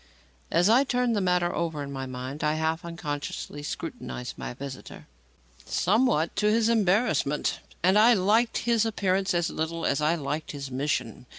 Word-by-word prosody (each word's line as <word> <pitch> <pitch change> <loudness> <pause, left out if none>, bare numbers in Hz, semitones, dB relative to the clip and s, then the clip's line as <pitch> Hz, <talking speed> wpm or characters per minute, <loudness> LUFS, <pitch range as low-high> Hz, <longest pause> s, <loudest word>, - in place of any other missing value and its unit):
As 175 +3 +3
I 235 +5 +5
turned 250 -3 0
the 205 - +1
matter 180 -1 +1
over 160 -4 -2
in 140 - -7
my 135 -1 -5
mind, 130 +4 -6
I 150 0 +2
half 160 +2 -1
unconsciously 145 -3 -5
scrutinized 150 - -6
my - - -6
visitor 135 0 -9 0.6
somewhat 210 -5 +1
to 210 - +3
his 225 +1 +3
embarrassment 205 - +1 0.2
and 190 +3 +5
I 235 +2 +7
liked 215 +6 +2
his 235 -2 +3
appearance 195 -4 0
as 170 -1 0
little 165 +1 -3
as 140 +1 +1
I 155 +3 +2
liked 155 0 -4
his 140 -2 -6
mission. 130 -3 -2
170 Hz, 165 wpm, -27 LUFS, 145-210 Hz, 0.6 s, I